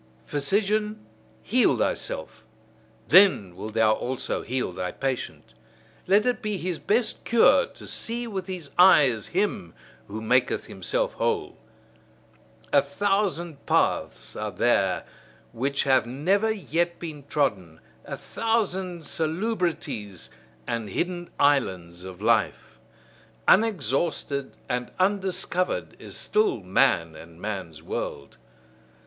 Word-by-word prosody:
Physician, 210 - 0 0.4
heal 230 - +3
thyself: 110 0 -3 0.6
then 170 - +6
wilt 110 +3 -7
thou 110 -1 +4
also 125 +3 -3
heal 125 -5 -2
thy 90 0 -4
patient. 135 -2 -4 0.5
Let 200 +3 +4
it 245 -3 0
be 210 -2 -2
his 180 -2 -3
best 225 +3 0
cure 235 - +5
to - - -14
see 235 +1 -3
with 195 -5 -5
his 175 -7 -6
eyes 140 - +6
him 185 - -1 0.3
who 105 +2 -6
maketh 125 +3 +1
himself - - -2
whole. 410 -5 -1 1.2
A - - +7
thousand 195 -6 -1
paths - - 0
are - - -3
there - - +1 0.5
which 135 +4 0
have 130 -4 +3
never 190 - +1
yet 175 -4 -1
been 155 -4 -7
trodden; 95 - -1 0.2
a - - -6
thousand 190 -6 -1
salubrities 160 - -3 0.3
and 115 -3 -3
hidden 175 - -3
islands 95 -12 +1
of 95 -1 -9
life. 115 -1 +1 0.7
Unexhausted 155 - +1
and 125 0 -2
undiscovered 185 -1 0
is - - -8
still 425 -2 +1
man 85 -3 +2
and 85 +1 -13
man's 95 -7 -5
world. 70 -4 -5
160 Hz, 110 wpm, -26 LUFS, -, 1.2 s, A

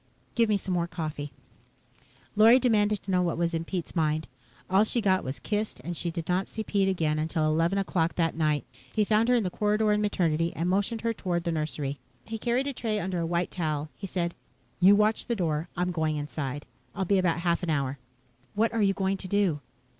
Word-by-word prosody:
"Give 230 -2 +2
me 210 - +3
some 190 -1 -3
more 170 -1 0
coffee." 155 -4 -5 1.0
Lorry 225 +4 +8
demanded 210 -5 +2
to 195 - -4
know 180 -1 +3
what 170 -2 0
was 170 0 0
in 165 0 -1
Pete's 180 0 -4
mind. 155 -1 0 0.4
All 190 +3 +4
she 230 +2 0
got 190 -4 +2
was 130 +2 -4
kissed, 210 -5 -2
and 175 +4 -4
she 170 - -2
did 165 -1 -5
not 180 +2 0
see 220 - -5
Pete 200 -2 +1
again 155 -5 0
until 155 0 0
eleven 165 +5 +2
o'clock 175 -4 0
that 165 -2 +1
night. 155 -3 +1 0.3
He 215 -1 +3
found 220 +3 +3
her 250 - +5
in 235 - +2
the 180 - -2
corridor 210 +2 +1
in 210 0 +2
Maternity 170 -5 +1
and 170 - -1
motioned 205 +5 0
her 230 0 0
toward 175 -5 -2
the 170 - -1
nursery. 150 -3 -3 0.3
He 225 0 -5
carried 245 +4 0
a 280 - -2
tray 220 -4 -1
under 185 -2 -2
a 165 - -1
white 175 +1 -1
towel. 155 -3 -2
He 195 - -6
said, 170 -2 -2 0.5
"You 190 +3 +7
watch 210 +1 +2
the 235 - 0
door. 165 -3 -1
I'm 180 +1 0
going 160 -3 0
inside. 145 -1 -4 0.3
I'll 195 -2 -1
be 195 +1 +3
about 180 -3 +2
a 170 - -6
half 170 -1 +2
an 175 - -3
hour." 140 -3 -1 0.6
"What 225 +3 +2
are 230 - +1
you 195 -1 +3
going 195 0 0
to 190 - -7
do?" 190 -6 +1
180 Hz, 225 wpm, -28 LUFS, 160-210 Hz, 1.0 s, Lorry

